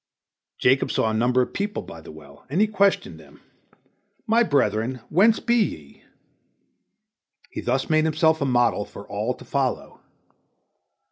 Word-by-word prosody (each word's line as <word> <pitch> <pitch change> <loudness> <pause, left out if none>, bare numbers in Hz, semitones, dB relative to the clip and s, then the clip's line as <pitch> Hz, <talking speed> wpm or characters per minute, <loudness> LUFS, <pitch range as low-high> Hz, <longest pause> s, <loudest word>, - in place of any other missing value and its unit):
Jacob 130 +2 +2
saw 110 - 0
a - - -3
number 125 +3 +2
of - - -8
people 205 +1 -3
by 80 - -11
the 80 - -12
well, 75 -2 -15
and 155 +7 -1
he 215 - +5
questioned 200 -2 0
them, - - -17 0.9
"My 230 +1 +3
brethren, 130 - 0
whence 215 +7 +4
be 235 0 +1
ye?" 75 - -8 1.5
He - - -5
thus 130 +2 -1
made 155 0 +2
himself 160 0 +2
a - - +1
model 120 -5 +2
for 100 - -12
all 110 +5 -3
to - - -14
follow. 135 -3 -2
130 Hz, 150 wpm, -23 LUFS, 110-170 Hz, 1.5 s, he